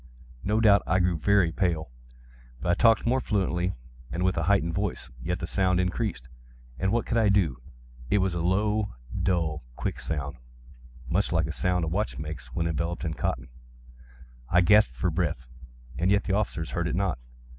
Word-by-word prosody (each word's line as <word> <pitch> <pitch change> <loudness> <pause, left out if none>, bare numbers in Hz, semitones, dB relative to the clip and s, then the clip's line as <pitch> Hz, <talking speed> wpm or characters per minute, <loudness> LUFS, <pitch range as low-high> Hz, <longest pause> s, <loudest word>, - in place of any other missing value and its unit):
No 105 +2 +1
doubt 105 -3 +6
I 95 - +3
now 95 - +2
grew 90 -2 +1
very 100 -1 +3
pale;—but - - -5
I 85 - +4
talked 115 +4 +4
more 130 +2 +2
fluently, 95 -4 0 0.4
and 90 +2 -2
with 95 0 +2
a 85 - 0
heightened 90 -4 +2
voice. 100 -9 -3
Yet 90 +6 -2
the - - -4
sound 90 +1 +1
increased—and - - -4
what 120 +1 +1
could 115 - 0
I 110 -2 +4
do? 85 -12 +2 0.5
It - - +3
was 95 -2 +1
a 85 - -2
low, 105 - +1 0.3
dull, 80 -5 0
quick - - -3
sound—much 65 +2 -5
such 80 -2 +1
a 80 - -3
sound 90 +2 0
as - - -2
a - - -3
watch 105 +3 -1
makes 75 -4 -6
when 80 +7 -2
enveloped 85 +2 -2
in 80 - -1
cotton. 65 -3 -3 1.0
I 90 - +5
gasped 105 - +5
for 85 +8 0
breath—and 65 -2 -4
yet 100 0 +3
the 95 - -2
officers 90 -6 -1
heard 85 -2 -1
it 85 - -2
not. 95 -8 0
85 Hz, 175 wpm, -27 LUFS, 65-95 Hz, 1.0 s, doubt